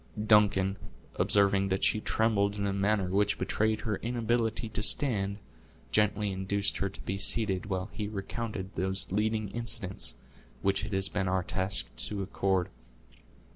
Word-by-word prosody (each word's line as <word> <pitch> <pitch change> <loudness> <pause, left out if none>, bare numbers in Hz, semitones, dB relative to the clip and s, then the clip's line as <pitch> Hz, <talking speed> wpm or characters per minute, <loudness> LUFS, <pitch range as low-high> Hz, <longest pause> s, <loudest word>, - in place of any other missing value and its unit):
Duncan, 100 -2 +4 0.4
observing 100 -1 +3
that 95 0 -1
she 110 - +3
trembled 105 -3 +1
in 100 0 -2
a 100 - 0
manner 100 -1 +1
which 100 +1 +2
betrayed 110 0 0
her 105 -3 -1
inability 115 -1 -1
to 105 - -2
stand, 100 -4 +1 0.5
gently 105 -1 +2
induced 95 +1 -1
her 95 - -1
to 95 - -13
be 95 +1 -3
seated, 100 -2 +2
while 95 -1 -2
he 105 -2 -3
recounted 105 -1 -5
those 95 +2 -2
leading 110 +1 0
incidents 105 -5 -4 0.5
which 100 +1 +1
it 105 - -6
has 95 0 +3
been 95 -1 -1
our 95 0 +1
task 95 +2 -1
to 100 -2 -2
accord. 95 -1 0
100 Hz, 150 wpm, -30 LUFS, 95-105 Hz, 0.5 s, Duncan